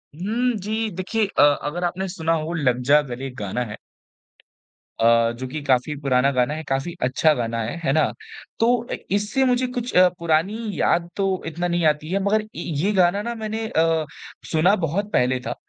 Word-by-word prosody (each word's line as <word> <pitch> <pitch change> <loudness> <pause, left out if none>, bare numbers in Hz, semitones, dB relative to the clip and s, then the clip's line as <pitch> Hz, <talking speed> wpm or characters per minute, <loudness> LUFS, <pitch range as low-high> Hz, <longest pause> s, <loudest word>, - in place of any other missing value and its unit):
हुँ, 230 +8 -1
जी। 215 +3 -2
देखिए 210 +4 0
अ, - - +1
अगर 145 +4 +2
आपने 180 +2 -2
सुना 165 -2 -1
हो 165 - -4
लग 125 -7 +1
जा 150 +1 +7
गले 125 +2 -5
एक 125 - -10
गाना 105 +3 -3
है। - - -7 1.2
अ, 115 0 +4
जो 130 - -4
की 150 +4 -5
काफ़ी 135 +2 +1
पुराना 135 0 +2
गाना 125 +2 +1
है 155 +1 -5
काफ़ी 135 +6 -1
अच्छा 130 +5 +3
गाना 115 -3 -2
है। 110 - -4
है 135 - +1
ना? 155 - +2 0.5
तो 240 +1 +2
ए - - 0 0.2
इससे 210 +7 +1
मुझे 250 0 +2
कुछ 250 -1 -4
अ, 185 0 +7
पुरानी 170 +4 +1 0.2
याद 170 0 +1
तो 195 - +1 0.2
इतना 170 +2 -2
नहीं 175 -1 0
आती 150 0 +1
है 195 - +1
मगर 210 +2 +2
इ 215 - -12 0.3
ये 190 +8 +1
गाना 185 +1 +3
ना 235 +2 -3
मैंने 220 0 -4
अ, 160 -4 +1 0.5
सुना 175 +5 +4
बहुत 190 +4 -2
पहले 125 +1 +2
था 120 0 -4
165 Hz, 195 wpm, -22 LUFS, 135-205 Hz, 1.2 s, जा